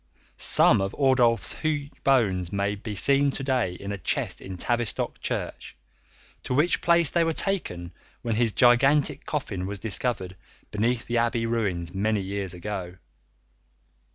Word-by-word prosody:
Some - - +4
of 95 0 -3
Ordulph's 125 -4 +3
huge 150 -2 -1
bones 100 -10 +2
may 100 +1 0
be 105 +1 -6
seen 140 +6 +4
to - - -5
day 130 -9 0
in 100 +3 -6
a 100 - -5
chest - - -1
in 95 -1 -7
Tavistock 120 +4 -2
church, - - -4 0.6
to 125 - -3
which 155 +6 +2
place 170 -3 +3
they 170 - +2
were 165 0 0
taken 90 - -1 0.3
when 115 - -1
his 115 0 +1
gigantic 135 +5 +3
coffin 100 - -3
was 100 +1 -4
discovered 95 -2 -2 0.4
beneath 115 +3 0
the 120 0 0
abbey 115 0 0
ruins 95 -7 -2
many 105 +2 0
years 95 -1 -4
ago. 90 -1 -5
115 Hz, 150 wpm, -26 LUFS, 95-135 Hz, 0.6 s, Some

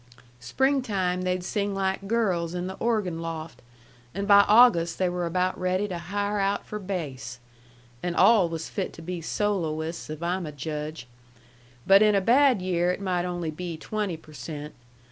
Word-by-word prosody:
Springtime 200 - 0
they'd 185 0 -1
sing 200 +1 -2
like 195 0 -1
girls 185 -7 0
in 180 0 -3
the 190 - -4
organ 210 -8 0
loft, 165 -1 -6 0.5
and 200 0 -2
by 200 -1 +8
August 205 -7 +5
they 185 - +1
were 175 -1 -2
about 185 +2 0
ready 185 +2 0
to 180 -3 -5
hire 205 +4 -2
out 200 +1 0
for 210 - -6
bass. 145 - -5 0.6
And 175 -1 -2
all 210 -7 +5
was 165 -1 -5
fit 195 - -4
to 165 - -11
be 175 0 -5
soloists, 165 -4 -2
if 155 +2 -6
I'm 175 0 -1
a - - -5
judge. 150 0 -5 0.8
But 195 +1 +7
in 210 -1 +5
a - - +4
bad 245 0 +4
year 180 -1 +1
it - - -4
might 180 -3 -1
only 175 -3 -3
be 170 +1 -6
twenty 205 -1 -3
per 155 -1 -17
cent. 150 +3 -7
180 Hz, 175 wpm, -26 LUFS, 165-200 Hz, 0.8 s, by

